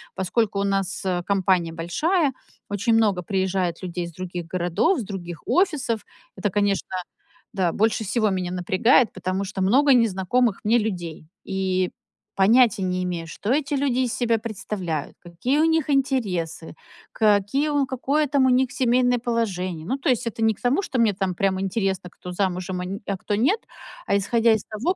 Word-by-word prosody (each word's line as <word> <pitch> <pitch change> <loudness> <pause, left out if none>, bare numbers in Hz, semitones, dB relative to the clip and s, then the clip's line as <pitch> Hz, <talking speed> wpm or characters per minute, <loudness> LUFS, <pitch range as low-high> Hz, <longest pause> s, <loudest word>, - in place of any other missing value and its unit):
Поскольку 200 +2 0
у - - +1
нас 195 -1 -1 0.2
компания 190 -4 +1
большая, 275 - 0 0.4
очень 205 +3 0
много 205 -5 +2
приезжает 190 -2 -1
людей 175 -1 -3
из 170 - -8
других 175 0 -6
городов, 180 - +1
с - - -3
других 175 -5 -7
офисов. 300 - +1 0.3
Это, 200 +1 -1
конечно, 205 0 0 0.6
да, 185 -4 +1
больше 220 +3 +1
всего 215 +1 +1
меня 180 -1 -2
напрягает, 190 +7 +3
потому 185 +1 -2
что 195 0 -5
много 265 +8 +5
незнакомых 230 0 +2
мне 230 +3 +4
людей. 175 -8 -3 0.2
И 185 -1 0 0.5
понятия 225 +1 +4
не 185 0 -1
имея, 175 -2 -3
что 200 +6 -6
эти 290 +2 0
люди 265 -2 +1
из 250 -2 0
себя 235 -2 +1
представляют, 195 -8 -4
какие 185 - -1
у 320 - +4
них 320 -2 +1
интересы, 205 - -1 0.4
какие 250 +8 +2
какое 275 +4 0
там 275 -1 +3
у 260 - +4
них 255 +1 +3
семейное 245 0 +2
положение. 185 -9 -2
Ну, 260 +10 -1
то 275 - -5
есть 245 -2 +1
это 225 - -4
не 220 0 +4
к - - -21
тому, 255 +10 +2
что 260 -10 -3
мне 220 -3 +4
там 190 -1 -2
прямо 190 0 0
интересно, 195 -2 -1
кто 180 +1 -10
замужем, 185 0 -2
а - - -4
н 195 +2 -5
а 200 - -1
кто 205 +2 -2
нет, 285 - +2 0.5
а - - +2
исходя 230 +3 +3
из 220 - -1
того, 245 - -2
205 Hz, 175 wpm, -23 LUFS, 185-245 Hz, 0.6 s, много